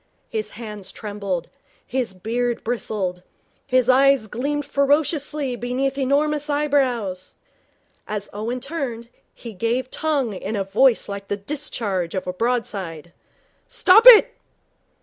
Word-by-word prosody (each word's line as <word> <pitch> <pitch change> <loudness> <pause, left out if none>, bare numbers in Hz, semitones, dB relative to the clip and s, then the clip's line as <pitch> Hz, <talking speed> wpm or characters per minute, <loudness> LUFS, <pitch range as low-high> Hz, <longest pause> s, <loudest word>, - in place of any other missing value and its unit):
His 440 -1 -3
hands 210 -4 -8
trembled. 200 -5 -4 0.4
His 250 -4 -2
beard 235 +5 -2
bristled. 200 -6 -3 0.5
His 255 -2 +2
eyes 270 -1 +4
gleamed 285 +7 -3
ferociously 285 -1 0
beneath 250 +3 -2
enormous 290 +2 0
eyebrows. 260 -10 0 0.7
As 210 -1 -4
Owen 225 +5 -3
turned, 255 -5 -5 0.2
he 230 -2 -10
gave 235 +6 -2
tongue 285 -8 -1
in 200 +3 -4
a 200 - 0
voice 235 +5 +3
like 200 0 -6
the 205 - -2
discharge 205 - -3
of 185 - -3
a 180 - -3
broadside. 190 -7 -3 0.5
'Stop 455 -2 +5
it!' 475 -4 +9
245 Hz, 120 wpm, -22 LUFS, 205-280 Hz, 0.7 s, it